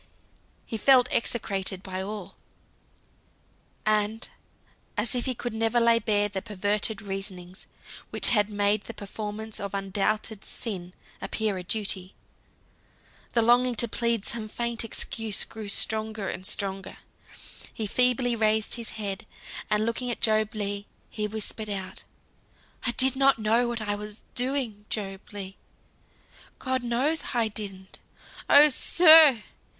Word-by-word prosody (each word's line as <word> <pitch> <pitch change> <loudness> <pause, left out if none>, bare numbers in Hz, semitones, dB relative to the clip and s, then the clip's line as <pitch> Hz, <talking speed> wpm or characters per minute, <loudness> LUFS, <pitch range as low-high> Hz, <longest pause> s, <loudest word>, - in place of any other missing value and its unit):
He 225 - -5
felt 255 +2 +5
execrated 195 -5 -1
by 185 -1 -5
all; 195 -1 -7 1.5
and 215 +1 0 0.7
as 215 +2 0
if 245 -1 -1
he 260 -2 0
could 240 0 -5
never 225 +1 +1
lay 230 0 +4
bare 205 -2 +2
the 195 -2 -4
perverted 210 +1 -2
reasonings 195 -2 -6 0.4
which - - +3
had 210 -3 +3
made 205 0 +1
the - - -8
performance 215 +1 -6
of 200 -1 -5
undoubted 200 +2 -2
sin 185 -6 -5 0.3
appear 215 -3 -1
a - - -7
duty. 190 -1 -2 1.2
The 230 - +3
longing 245 +1 +4
to 235 - +2
plead 230 -1 -1
some 225 -2 -2
faint 235 +1 -1
excuse 225 -2 0
grew 220 -2 -8
stronger 220 0 +2
and 185 - -5
stronger. 195 -2 -1 0.7
He 220 - -4
feebly 250 +2 +3
raised 215 -1 +1
his 235 -2 -2
head, 205 0 -4 0.4
and 210 +1 +1
looking 240 +2 -2
at 240 - -3
Job 215 -1 +1
Legh, 205 -1 -3 0.3
he 210 -1 -2
whispered 215 0 -4
out, 195 -2 -6 0.8
"I - - +4
did 265 +1 +4
not 275 -2 +4
know 225 +2 +2
what 235 -1 -3
I 205 -1 -1
was 210 +1 -7
doing, 245 -5 -1
Job 195 -3 -4
Legh; 195 -2 -7 1.0
God 260 -1 -1
knows 250 +6 -1
I 230 -2 +1
didn't! 195 -3 -5 0.5
Oh, 295 +1 +8
sir!" 315 -5 +7
215 Hz, 135 wpm, -26 LUFS, 200-235 Hz, 1.5 s, Oh